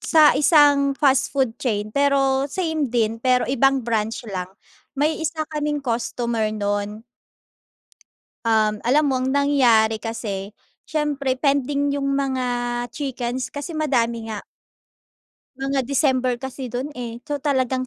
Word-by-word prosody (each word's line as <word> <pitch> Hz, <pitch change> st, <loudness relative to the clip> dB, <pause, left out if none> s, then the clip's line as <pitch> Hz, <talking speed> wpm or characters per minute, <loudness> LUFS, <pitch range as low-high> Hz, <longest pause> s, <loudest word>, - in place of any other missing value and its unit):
sa 310 Hz, -2 st, +5 dB
isang 285 Hz, -2 st, +5 dB
fast 275 Hz, -1 st, +3 dB
food 265 Hz, -5 st, 0 dB
chain 215 Hz, -4 st, -1 dB
pero, 275 Hz, -1 st, +2 dB
same 320 Hz, -4 st, -1 dB
din 225 Hz, -1 st, 0 dB
pero 250 Hz, 0 st, +3 dB
ibang 270 Hz, 0 st, +2 dB
branch 225 Hz, 0 st, -1 dB
lang, 185 Hz, -1 st, -4 dB, 0.5 s
may 300 Hz, +3 st, +1 dB
isa 315 Hz, 0 st, -2 dB
kaming 295 Hz, -1 st, -2 dB
customer 235 Hz, -2 st, -1 dB
nun 205 Hz, +1 st, -2 dB, 1.4 s
Um, 215 Hz, -2 st, +2 dB
alam 280 Hz, +6 st, +3 dB
mo 265 Hz, -, +1 dB
ang 260 Hz, -, 0 dB
nangyari 250 Hz, -6 st, +3 dB
kasi, 205 Hz, -3 st, -4 dB, 0.3 s
siyempre 285 Hz, -4 st, -1 dB
pending 280 Hz, 0 st, +1 dB
yung 275 Hz, -1 st, -1 dB
mga 265 Hz, -2 st, -1 dB, 0.5 s
chickens 255 Hz, -3 st, -3 dB
kasi 290 Hz, +4 st, -6 dB
madami 235 Hz, -7 st, 0 dB
nga. 215 Hz, -2 st, -5 dB, 1.1 s
Mga 270 Hz, -1 st, -2 dB
December 260 Hz, -3 st, +1 dB
kasi 265 Hz, 0 st, -6 dB
dun 250 Hz, +4 st, -4 dB
eh, 235 Hz, -1 st, -6 dB
so 295 Hz, -1 st, -3 dB
talagang 260 Hz, -2 st, 0 dB
265 Hz, 130 wpm, -22 LUFS, 230-285 Hz, 1.4 s, sa